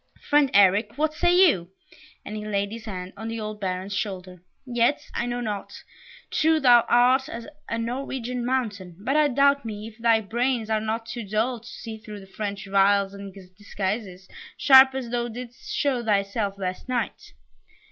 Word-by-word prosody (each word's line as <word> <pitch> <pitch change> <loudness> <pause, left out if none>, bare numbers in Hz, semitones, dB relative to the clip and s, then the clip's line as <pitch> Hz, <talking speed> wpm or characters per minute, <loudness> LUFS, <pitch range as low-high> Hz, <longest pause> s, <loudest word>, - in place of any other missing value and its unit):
Friend 290 -1 +4
Eric, 205 +4 +4
what 310 +1 +1
say 350 +3 +2
you?" 175 - 0 0.6
and 210 - -6
he 210 - -5
laid 200 -1 -1
his 225 0 -8
hand 185 -3 -6
on 220 +2 -7
the 225 0 -4
old 215 -1 -6
Baron's 190 +1 -3
shoulder. 185 -3 -4 0.2
"Yet, 240 +2 +1
I 240 - -2
know 245 0 -3
not; 210 -4 -4 0.6
true 320 0 +3
thou 245 -4 +6
art, 255 +3 +4
as 230 -4 -7 0.2
a 230 - -1
Norwegian 250 +1 -3
mountain, 215 -8 -2
but 255 +8 -1
I 305 -1 +5
doubt 280 +1 +3
me 215 -2 -6
if 220 +1 -20
thy 230 -1 +4
brains 235 +1 -1
are 215 -1 +1
not 220 +1 -3
too 235 0 -6
dull 220 +5 -1
to 235 - -16
see 220 -2 -8
through 215 -2 -9
the - - -12
French 200 0 -5
wiles 195 0 +3
and 200 0 -8 0.2
disguises, 195 -1 -4 0.3
sharp 265 -1 +7
as 250 -3 -4
thou 240 -1 -1
didst 245 +1 -9
show 260 -4 0
thyself 200 -1 0
last 185 +5 -5
night." 245 -2 -3
225 Hz, 180 wpm, -25 LUFS, 200-245 Hz, 0.6 s, sharp